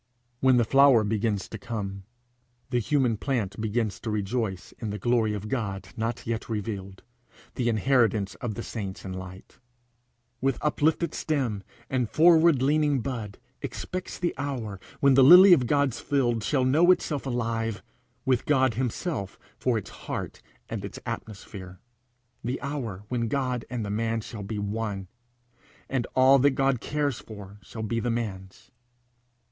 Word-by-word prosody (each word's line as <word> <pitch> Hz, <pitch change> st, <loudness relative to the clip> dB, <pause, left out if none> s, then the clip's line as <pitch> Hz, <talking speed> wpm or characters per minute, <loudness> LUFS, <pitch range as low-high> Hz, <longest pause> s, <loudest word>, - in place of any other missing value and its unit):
When 130 Hz, -1 st, +5 dB
the 120 Hz, -, +3 dB
flower 135 Hz, -2 st, +6 dB
begins 105 Hz, -2 st, -1 dB
to 110 Hz, -, -8 dB
come, 100 Hz, -3 st, -5 dB, 0.7 s
the 125 Hz, -, +2 dB
human 125 Hz, -1 st, +1 dB
plant 110 Hz, -5 st, -2 dB
begins 110 Hz, -1 st, -1 dB
to 110 Hz, -, -5 dB
rejoice 105 Hz, -2 st, -2 dB
in 115 Hz, -, -4 dB
the 105 Hz, -, -3 dB
glory 110 Hz, 0 st, +1 dB
of 105 Hz, +1 st, -5 dB
God 100 Hz, -6 st, -3 dB
not 115 Hz, +1 st, -3 dB
yet 115 Hz, 0 st, -3 dB
revealed, 100 Hz, -3 st, -5 dB, 0.5 s
the 120 Hz, -2 st, 0 dB
inheritance 110 Hz, -3 st, +2 dB
of 115 Hz, -4 st, -3 dB
the 115 Hz, -, -5 dB
saints 100 Hz, -5 st, -6 dB
in 95 Hz, -, -5 dB
light; 95 Hz, 0 st, -10 dB, 0.8 s
with 135 Hz, +1 st, +1 dB
uplifted 155 Hz, +2 st, +1 dB
stem 130 Hz, -10 st, -1 dB, 0.3 s
and 125 Hz, -4 st, -1 dB
forward 165 Hz, -4 st, +5 dB
leaning 145 Hz, -1 st, +2 dB
bud 110 Hz, -5 st, -5 dB, 0.2 s
expects 185 Hz, 0 st, -5 dB
the 175 Hz, -1 st, -1 dB
hour 120 Hz, -8 st, -4 dB, 0.2 s
when 140 Hz, -1 st, +6 dB
the 135 Hz, 0 st, +7 dB
lily 180 Hz, +7 st, +10 dB
of 130 Hz, -8 st, +3 dB
God's 140 Hz, -2 st, +1 dB
field 120 Hz, -6 st, 0 dB
shall 130 Hz, +3 st, +1 dB
know 155 Hz, +7 st, +4 dB
itself 150 Hz, -6 st, +2 dB
alive, 115 Hz, -3 st, -2 dB, 0.4 s
with 130 Hz, -2 st, +1 dB
God 130 Hz, -4 st, +3 dB
himself 125 Hz, -, -3 dB, 0.2 s
for 125 Hz, -3 st, 0 dB
its 100 Hz, -4 st, -6 dB
heart -, -, -6 dB, 0.3 s
and -, -, -5 dB
its -, -, -7 dB
atmosphere; 95 Hz, -3 st, -7 dB, 0.6 s
the 125 Hz, +3 st, -2 dB
hour 125 Hz, -9 st, -4 dB
when 120 Hz, -2 st, -1 dB
God 125 Hz, -1 st, -1 dB
and 120 Hz, -4 st, -3 dB
the 100 Hz, -, -4 dB
man 115 Hz, +1 st, -1 dB
shall 110 Hz, 0 st, -8 dB
be 100 Hz, +2 st, -5 dB
one, 100 Hz, -2 st, -3 dB, 0.8 s
and 125 Hz, -3 st, -1 dB
all 130 Hz, +1 st, +6 dB
that 140 Hz, +1 st, +3 dB
God 135 Hz, -3 st, +2 dB
cares 145 Hz, -4 st, -1 dB
for 100 Hz, -2 st, -11 dB
shall 110 Hz, +3 st, -7 dB
be 115 Hz, +2 st, -1 dB
the 120 Hz, -, -1 dB
man's. 100 Hz, -5 st, -5 dB
115 Hz, 155 wpm, -27 LUFS, 105-135 Hz, 0.8 s, lily